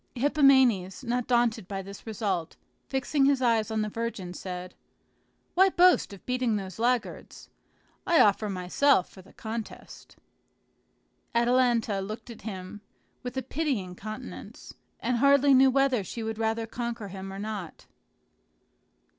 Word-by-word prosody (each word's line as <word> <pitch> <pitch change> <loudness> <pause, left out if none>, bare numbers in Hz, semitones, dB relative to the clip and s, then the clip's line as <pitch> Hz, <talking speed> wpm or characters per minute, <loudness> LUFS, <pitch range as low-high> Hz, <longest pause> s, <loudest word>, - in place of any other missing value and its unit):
Hippomenes, 265 - +3
not 245 0 -2
daunted 240 -6 +1
by 195 -1 -4
this 200 +3 -11
result, 195 -7 -3 0.3
fixing 270 +1 +1
his 275 -1 +3
eyes 230 -4 +2
on 220 -1 -1
the - - -2
virgin, 210 -5 -4
said, 180 0 -7 0.8
"Why 380 +2 +5
boast 360 - +4
of 200 - -12
beating 250 -3 0
those 195 0 -6
laggards? 240 0 -2 0.6
I 340 - +4
offer 210 +1 +4
myself 185 +5 +2
for 190 - -13
the 190 - -19
contest." 220 0 -8 1.2
Atalanta 235 -3 +2
looked 215 +5 -7
at 230 - -12
him 190 -1 -7 0.4
with 250 +1 -6
a 260 - -1
pitying 255 - -2
countenance, 215 +6 -9 0.3
and 250 - 0
hardly 280 +2 +5
knew 265 0 +6
whether 260 -4 +2
she 225 +5 -6
would 220 0 -4
rather 225 0 0
conquer 230 -2 -5
him 190 0 -7
or 195 - -7
not. 205 -4 -6
225 Hz, 140 wpm, -27 LUFS, 200-255 Hz, 1.2 s, knew